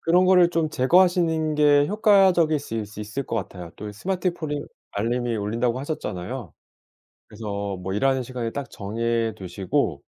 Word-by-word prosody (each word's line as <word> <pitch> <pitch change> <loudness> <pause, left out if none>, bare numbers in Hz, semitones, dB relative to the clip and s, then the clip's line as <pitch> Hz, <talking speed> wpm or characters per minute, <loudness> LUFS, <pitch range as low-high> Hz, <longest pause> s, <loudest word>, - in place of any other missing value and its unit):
그런 175 +2 +3
거를 180 -2 +5
좀 165 -2 0
제거하시는 160 +1 +3
게 145 -1 +5
효과적일 190 -7 +4
수 125 - -7
있을 105 -1 -5
있을 110 +6 -4
것 - - -4
같아요. 90 -4 -6
또 105 0 -6
스마트폰이 170 - -2 0.3
알림이 120 +3 -1
울린다고 115 +4 -1
하셨잖아요. 130 - -5 0.8
그래서 100 -2 -5
뭐 95 +1 -5
일하는 130 +5 +1
시간을 120 -2 -4
딱 140 -1 -5
정해 115 +2 -1
두시고 95 - -2
125 Hz, 345 characters per minute, -24 LUFS, 105-160 Hz, 0.8 s, 거를